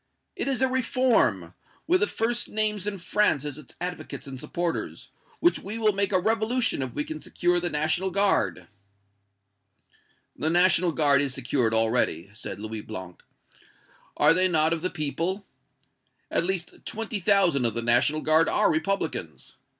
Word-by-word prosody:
It - - -3
is 265 -1 0
a - - +4
reform, 240 - +1 0.3
with 360 +3 +3
the 430 - +2
first 240 +2 -1
names 210 -2 -1
in 205 -1 -3
France 185 -5 +1
as 145 0 -5
its 140 - -14
advocates 180 +1 -6
and 135 -2 -8
supporters, 170 +5 -4 0.3
which 345 - +2
we 210 +4 -5
will 215 -2 +2
make 200 0 0
a 185 - +3
revolution 225 - 0
if 130 -2 -4
we 145 - -1
can 155 0 -7
secure 175 0 0
the 175 0 -2
National 160 +5 0
Guard." 185 - 0 1.7
"The 155 - -1
National 175 0 +3
Guard 145 -3 +4
is 135 -2 -1
secured 120 -3 0
already," 110 -6 +1
said 105 - -7
Louis 110 0 -6
Blanc. 95 -5 -9 1.0
"Are - - +5
they 185 +2 +3
not 160 -2 +2
of 165 - -3
the 185 - -1
people? 170 +5 -3 0.9
At 170 - +2
least 185 -1 -4
twenty 225 -1 -3
thousand 180 -9 +3
of 115 - 0
the 115 - -2
National 120 +6 +3
Guard 155 +1 +4
are - - +2
Republicans. 180 +6 -3
170 Hz, 160 wpm, -25 LUFS, 140-205 Hz, 1.7 s, Are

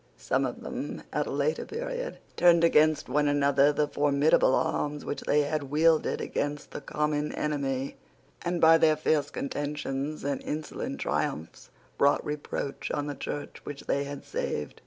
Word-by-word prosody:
Some - - 0
of - - -7
them, - - -5
at - - 0
a - - -4
later 470 - 0
period, - - -4 0.2
turned 170 -1 +5
against 155 -2 +4
one 145 +3 +2
another 140 0 +4
the 150 0 +1
formidable 145 -1 +3
arms 150 0 -1
which - - -3
they 150 - +3
had 145 -1 -2
wielded 160 +2 +3
against 145 0 -3
the - - -6
common 150 +1 -1
enemy, 140 -3 -2 0.4
and 175 0 -1
by 165 0 +7
their 155 -1 +5
fierce 150 -1 +1
contentions 145 0 -3
and 140 0 -1
insolent 155 +1 -4
triumphs 80 +2 -3 0.3
brought 140 +1 +3
reproach 145 -2 -4
on 145 - -1
the 145 - -3
Church 145 +1 -6
which 145 -1 -7
they 140 0 0
had 140 0 -7
saved. 75 -1 -3
145 Hz, 155 wpm, -28 LUFS, 140-155 Hz, 0.4 s, by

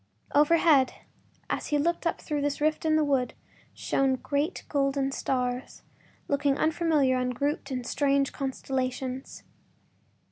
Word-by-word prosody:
Overhead, 295 -2 +4 0.5
as - - -3
he 295 - +1
looked 340 +3 0
up - - -1
through 295 -1 -3
this 285 0 -1
rift 310 +2 0
in 310 -1 +3
the 310 - +3
wood, 270 -4 0 0.4
shone 270 -1 +1
great 285 +6 -2
golden 275 -1 0
stars 250 -1 -2 0.4
looking 280 -1 +1
unfamiliar 310 -5 +2
and 250 0 -1
grouped 285 +1 -2
in 250 -1 -2
strange 275 +1 +1
constellations. 260 -1 -3
280 Hz, 130 wpm, -28 LUFS, 260-300 Hz, 0.5 s, Overhead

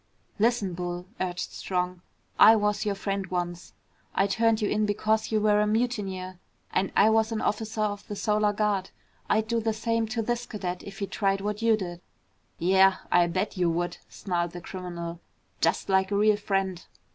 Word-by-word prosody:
"Listen, 220 -4 +2
Bull," 175 0 -4
urged 180 -1 -3
Strong, 180 -1 -2 0.4
"I 225 - +9
was 210 0 0
your 200 - 0
friend 195 0 -3
once. 175 -1 -4 0.4
I 195 - +3
turned 225 +2 +2
you 210 - 0
in 210 +1 +1
because 215 +2 0
you 215 - +3
were 210 0 +3
a 210 - +2
mutineer 200 -5 -2 0.3
and 190 +1 +1
I 215 +2 +6
was 220 0 +2
an 220 - -1
officer 220 +1 -2
of 205 -1 -2
the 205 - -5
Solar 210 0 +2
Guard. 205 -2 0 0.4
I'd 220 +1 +2
do 230 0 +1
the 225 0 0
same 230 +1 0
to 225 +1 -2
this 240 +2 -2
cadet 185 -5 -4
if 195 -1 -10
he 200 - -2
tried 195 -1 0
what 210 +2 -3
you 225 -1 +4
did." 175 -3 -6 0.6
"Yeah, 190 +2 +5 0.2
I'll 175 -1 +5
bet 185 +4 -2
you 175 -2 +2
would," 175 +1 -1
snarled 175 -3 -2
the 175 - -7
criminal. 170 -2 -6 0.4
"Just - - +1
like 190 -1 +2
a 205 - -1
real 210 +1 +4
friend!" 195 -3 -1
200 Hz, 185 wpm, -27 LUFS, 185-215 Hz, 0.6 s, I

